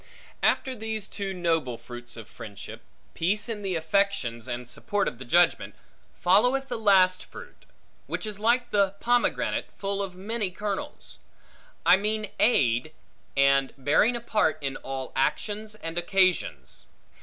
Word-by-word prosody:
After 260 -1 +2
these 220 -2 -3
two 200 -1 -4
noble 165 -9 0
fruits 120 0 -10
of 115 - -9
friendship 105 -4 -10 0.3
(peace 200 +5 0
in 220 -3 -4
the 190 -3 -2
affections, 160 - 0
and 120 -1 -4
support 200 +11 -1
of 125 - -4
the 130 - -8
judgment), 175 +7 +3 0.4
followeth 250 +9 +3
the 240 -2 -3
last 190 -4 +4
fruit; - - -13 0.4
which - - -3
is 210 -2 -5
like 240 +3 +2
the 200 -1 +2
pomegranate, 245 0 +1
full 200 0 -2
of 190 -2 -5
many 205 +2 -2
kernels; 200 +2 -5 0.7
I 185 - +7
mean 210 +1 -2
aid, 135 - +3 0.4
and 140 -1 +4
bearing 145 - +3
a 240 - -4
part, 210 -9 +1
in 135 -2 -3
all 135 -1 -6
actions 210 +10 -1
and 165 -4 -4
occasions. 175 - 0
190 Hz, 145 wpm, -27 LUFS, 135-210 Hz, 0.7 s, I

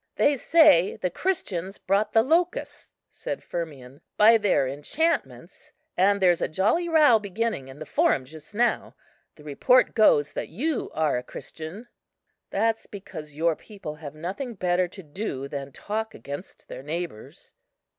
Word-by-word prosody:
"They 290 - +3
say 275 - +5
the 180 - -2
Christians 195 - -2
brought 200 +3 0
the 225 - +4
locusts," 335 +6 0 0.2
said - - -6
Firmian, 140 -6 -7 0.2
"by 225 +2 +7
their 195 -10 +2
enchantments; 220 - -3 0.2
and 200 +2 +3
there's 180 -3 +3
a - - +1
jolly 215 - +1
row 300 -8 +6
beginning 205 -7 -3
in 135 +1 -11
the 155 - -7
Forum 135 -2 +1
just 155 +7 -13
now. 240 +2 0 0.4
The 150 - -16
report 150 - +3
goes 145 - +4
that - - -4
you 280 - -2
are 155 -5 +1
a - - -9
Christian." 160 - -9 0.6
"That's 225 +2 0
because 160 -7 -9
your 165 +1 +1
people 195 -7 -9
have 150 -2 -9
nothing 200 - -5
better 180 -1 +1
to 190 +2 -12
do 145 -4 -5
than 140 -1 -6
talk 220 +7 -4
against 145 +6 -9
their - - -8
neighbours." 155 -5 -7
185 Hz, 150 wpm, -25 LUFS, 150-225 Hz, 0.6 s, by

